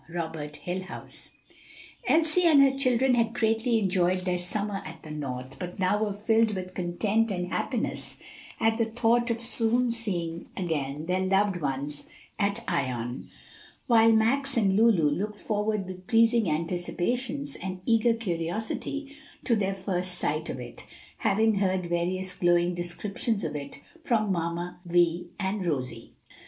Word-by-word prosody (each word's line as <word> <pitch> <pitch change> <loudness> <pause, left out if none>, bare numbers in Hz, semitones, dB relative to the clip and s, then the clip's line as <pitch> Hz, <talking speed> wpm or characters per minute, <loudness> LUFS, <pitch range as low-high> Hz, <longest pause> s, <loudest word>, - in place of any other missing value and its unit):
Robert 160 -3 -5
Hillhouse. 185 +2 -6 0.8
Elsie 325 +2 +4
and 310 -4 +7
her 270 -1 +3
children 260 -1 +2
had 230 -1 +1
greatly 225 +1 +2
enjoyed 185 -2 +1
their 180 -1 0
summer 200 +2 -2
at 160 0 -10
the 155 - -9
North, 130 -3 -5
but 180 0 -6
now 200 +3 +1
were 210 - -1
filled 220 +1 +2
with 185 -1 -5
content 200 +6 0
and 180 -2 -3
happiness - - -2 0.4
at 225 +1 +2
the 230 - +3
thought 235 +1 +1
of 230 0 0
soon 235 +1 +1
seeing 175 -8 -1
again 150 -4 -2
their 180 +2 0
loved 195 +1 +2
home 140 -3 -2 0.5
at 205 +3 0
Ion, 125 -6 -2 0.6
while 225 -2 +6
Max 250 +5 +3
and 195 -4 +3
Lulu 210 -8 +4
looked 205 +8 -2
forward 210 -2 -1
with 185 0 -9
pleasing 230 -3 +4
anticipations 185 - -1
and 185 -1 -5
eager 230 0 +3
curiosity 220 - -3 0.3
to 235 - +2
their 195 -2 0
first 185 -1 -1
sight 155 0 -1
of - - -4
it, 120 -1 -8 0.4
having 220 +2 +3
heard 190 -2 +1
various 180 +2 0
glowing 175 0 +2
descriptions 195 +5 -1
of - - -3
it 140 -1 -6 0.2
from 215 -6 +1
"Mamma 170 0 -3
Vi" 175 -1 +2
and 195 0 -1
Rosie. 130 -8 -3
190 Hz, 145 wpm, -27 LUFS, 175-225 Hz, 0.8 s, and